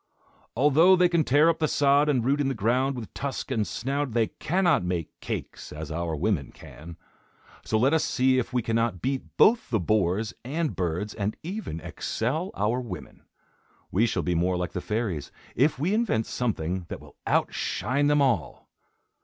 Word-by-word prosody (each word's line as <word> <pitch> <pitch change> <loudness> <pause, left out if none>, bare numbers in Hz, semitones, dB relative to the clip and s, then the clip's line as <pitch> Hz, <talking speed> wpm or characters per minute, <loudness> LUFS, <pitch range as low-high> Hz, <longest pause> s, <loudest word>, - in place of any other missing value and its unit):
"Although 150 +8 +5
they 180 -1 +4
can 170 -2 +2
tear 145 +4 +4
up 165 - +2
the 155 - +2
sod 145 +1 +3
and 125 -5 +1
root 140 +3 +2
in 140 - +1
the 135 - -1
ground 125 +6 +1
with 115 -4 -8
tusk 140 0 -4
and 110 -6 0
snout, 135 +7 -2
they 115 -1 +2
cannot 175 - +2
make 90 -3 -2
cakes, - - -6
as 80 0 -7
our 85 0 -2
women 80 -3 -1
can. 80 +2 -12 0.7
So 110 - 0
let 130 +7 +3
us 160 - +3
see 130 0 +2
if 125 - -3
we 125 -2 0
cannot 115 -4 -1
beat 135 +1 0 0.2
both 230 +1 +4
the 110 - +1
boars 100 +2 0
and 150 +5 -2
birds, 90 +4 -2
and 105 0 -3
even 180 - -5
excel 150 - -2
our 105 +5 0
women. 95 - -9 0.7
We 110 +6 +3
shall 90 -6 -1
be 90 - 0
more 90 +2 +1
like 90 0 -3
the 90 - -4
fairies, 105 -10 -3 0.2
if 145 +4 +3
we 165 +9 0
invent 210 - +1
something 95 -7 -2
that - - -5
will - - -16
outshine 140 +3 0
them 145 -1 +4
all." 100 - -1
120 Hz, 180 wpm, -26 LUFS, 95-145 Hz, 0.7 s, Although